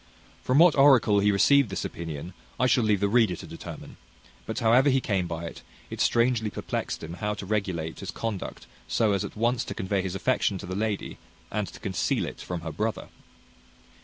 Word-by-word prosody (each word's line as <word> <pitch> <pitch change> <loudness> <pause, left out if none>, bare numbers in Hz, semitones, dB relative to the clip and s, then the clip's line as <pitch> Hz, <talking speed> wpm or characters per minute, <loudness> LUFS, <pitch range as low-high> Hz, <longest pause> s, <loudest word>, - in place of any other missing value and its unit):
From 130 - +1
what 170 0 +7
oracle 130 -7 +6
he 105 +1 +3
received 140 +5 +4
this 95 - -3
opinion, 80 +1 -6 0.3
I 130 - +3
shall 125 -1 +3
leave 105 -3 +2
the 100 - +3
reader 110 -4 +3
to - - -9
determine: - - -9 0.5
but 110 - -4
however 125 +4 +4
he 135 0 +3
came 95 -8 -1
by 85 0 -5
it, 85 - -8 0.3
it - - -4
strangely 115 -2 +2
perplexed - - -4
him 80 +1 -6
how 105 0 -1
to 100 - -7
regulate 95 -6 -2
his - - -6
conduct 110 -5 -5 0.2
so 110 -2 +2
as 100 -2 0
at - - -7
once 115 +2 +1
to - - -6
convey 95 +1 -1
his 95 0 -4
affection 105 -2 +1
to - - -8
the 90 - -5
lady, 105 0 -3 0.3
and 105 -2 -1
to - - -11
conceal 90 -4 -1
it - - -8
from 90 -2 -5
her 80 -1 -5
brother. 110 +8 -3
105 Hz, 200 wpm, -27 LUFS, 95-115 Hz, 0.5 s, what